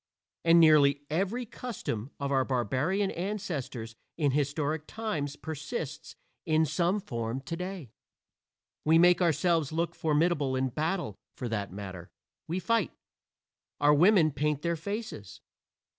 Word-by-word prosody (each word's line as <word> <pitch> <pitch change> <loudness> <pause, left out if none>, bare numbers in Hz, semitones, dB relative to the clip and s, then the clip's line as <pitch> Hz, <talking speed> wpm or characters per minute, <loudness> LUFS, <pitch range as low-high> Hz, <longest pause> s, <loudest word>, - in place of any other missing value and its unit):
And 165 0 +6
nearly 145 -3 +6
every 200 +9 0
custom 210 - -5
of 140 0 -2
our 135 -1 +3
barbarian 135 - 0
ancestors 165 - -4 0.2
in 145 -4 +2
historic 145 +2 -1
times 155 -11 -3
persists 150 -1 -6 0.3
in 160 0 +3
some 170 +6 +1
form 120 - -3
today. 170 - -6 0.9
We 160 +1 +5
make 175 +1 +6
ourselves 165 -2 +2
look 165 +2 -1
formidable 150 -3 +1
in 130 0 0
battle 160 - -2 0.2
for 125 - -4
that 100 -4 -3
matter, 95 -3 -8 0.4
we 170 - -2
fight. 225 -1 +1 0.9
Our 145 +1 +5
women 170 0 +5
paint 150 +1 -1
their 170 0 +1
faces. 165 - -6
155 Hz, 125 wpm, -29 LUFS, 135-175 Hz, 0.9 s, And